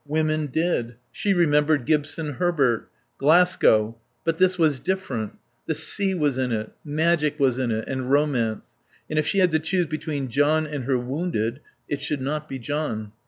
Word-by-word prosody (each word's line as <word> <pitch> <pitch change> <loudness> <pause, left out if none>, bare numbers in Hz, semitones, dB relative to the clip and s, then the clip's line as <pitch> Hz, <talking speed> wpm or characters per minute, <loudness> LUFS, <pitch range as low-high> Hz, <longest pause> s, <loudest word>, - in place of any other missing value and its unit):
Women 155 0 0
did. 130 -5 -1 0.2
She 205 - -1
remembered 150 -6 +3
Gibson 150 0 0
Herbert. 145 -10 +1 0.3
Glasgow.... 135 -8 +4 0.2
But 165 -1 -1
this 185 0 +4
was 155 -5 +2
different. 140 - -3 0.3
The - - 0
sea 195 -2 0
was 145 -6 0
in 130 -1 0
it, 110 -1 -2
magic 155 0 +1
was 130 -2 +2
in 130 -2 0
it 110 0 -2
and 130 -1 -3
romance. 135 -6 +1 0.4
And 155 - +1
if 155 - 0
she - - 0
had 185 -3 +4
to 160 - +2
choose 175 +3 0
between 150 -3 -4
John 145 +5 +2
and 145 -4 -5
her 130 -1 +2
wounded 125 -2 -2 0.3
it 140 -1 -3
should 145 0 -2
not 150 +2 -3
be 135 - -4
John. 125 -6 -3
150 Hz, 170 wpm, -24 LUFS, 130-160 Hz, 0.4 s, Glasgow